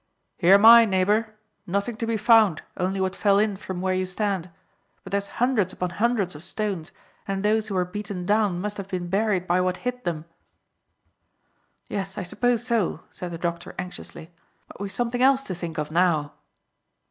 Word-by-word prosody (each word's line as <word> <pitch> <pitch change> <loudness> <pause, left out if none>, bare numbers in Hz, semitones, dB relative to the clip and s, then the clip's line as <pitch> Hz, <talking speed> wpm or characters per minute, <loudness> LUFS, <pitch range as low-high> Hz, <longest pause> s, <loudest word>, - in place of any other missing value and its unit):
"Here 185 +2 +7
am 200 +2 +5
I, 230 0 +10
neighbour. 210 +3 +1 0.3
Nothing 200 +6 -1
to 230 - -3
be 225 -1 0
found, 215 -6 +4
only 190 +1 -1
what 190 0 -1
fell 200 -1 +3
in 210 -1 +2
from 190 -2 -6
where 185 0 0
you 185 0 -1
stand. 190 -2 -2 0.5
But - - -10
there's 200 0 -1
hundreds 230 -7 +1
upon 180 -1 -3
hundreds 210 -2 0
of 150 - -10
stones, 185 -2 -3 0.4
and 195 0 -2
those 215 +1 +2
who 200 - -4
were 180 -1 +1
beaten 200 -1 -6
down 205 -3 +2
must 205 +2 -4
have 200 -2 -6
been 180 -2 -4
buried 195 -1 +1
by 180 0 +2
what 180 0 0
hit 250 0 -3
them." 165 -3 -3 1.6
"Yes, 195 -1 -4
I - - -2
suppose 240 +5 0
so," 225 -9 0
said 180 - -7
the 170 - -6
doctor 170 0 -4
anxiously; 180 -2 -8 0.4
"but - - -13
we've 200 -1 -4
something 240 +4 -1
else 270 +1 +4
to 190 - -5
think 170 -2 -6
of 150 0 -3
now." 160 -4 +1
195 Hz, 185 wpm, -24 LUFS, 180-215 Hz, 1.6 s, I